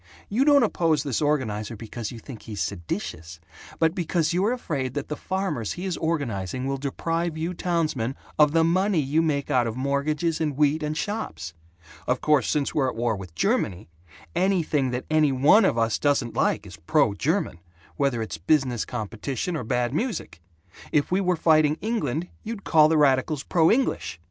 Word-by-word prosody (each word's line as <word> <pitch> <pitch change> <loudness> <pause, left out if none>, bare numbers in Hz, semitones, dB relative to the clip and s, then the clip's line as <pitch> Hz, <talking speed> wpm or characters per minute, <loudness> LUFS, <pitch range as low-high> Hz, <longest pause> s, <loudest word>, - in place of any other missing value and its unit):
You 245 +7 +2
don't 285 -3 +6
oppose 165 -8 +1
this 140 -4 -2
organizer 115 -8 -1
because 110 +1 -6
you 120 - -8
think 115 -1 -10
he's 105 -3 -7
seditious 85 -2 -4 0.4
but 160 0 +2
because 170 -2 0
you're 195 +6 +2
afraid 140 - -3
that 145 - -4
the 150 - -2
farmers 190 - -2
he 180 - -6
is 185 -3 -1
organizing 130 - -2
will 135 0 -1
deprive 165 +4 -2
you 165 +3 -2
townsmen 155 -9 -1 0.2
of 150 -1 +6
the 165 +1 +3
money 185 +3 +2
you 150 +3 +1
make 145 -3 -1
out 125 -3 +3
of 115 - -4
mortgages 150 +4 0
and 150 -4 -1
wheat 150 +1 +2
and 150 0 -2
shops. 85 - -4 0.5
Of 125 0 +1
course, 150 -6 +2
since 145 -2 0
we're 135 -3 +1
at - - -6
war 115 -1 0
with 95 -4 -10
Germany, 90 +3 0 0.5
anything 170 -7 +1
that 125 +1 -3
any 155 -2 +4
one 145 - +5
of 120 - +1
us 115 -1 +1
doesn't 140 -5 +1
like - - 0
is - - -11
'pro 110 - +2
German,' 145 - -1 0.4
whether 135 -5 0
it's 80 -6 -6
business 125 - +1
competition 120 - -4
or 150 - -3
bad 120 +2 -1
music. 160 - -3 0.5
If 145 +2 +1
we 185 +2 +2
were 180 -1 +2
fighting 155 -2 +3
England, 180 - -2
you'd 220 -2 -6
call 155 -2 +5
the 160 - +3
radicals 140 0 +2
'pro 165 -2 +3
English.' 250 - 0
145 Hz, 180 wpm, -25 LUFS, 120-165 Hz, 0.5 s, don't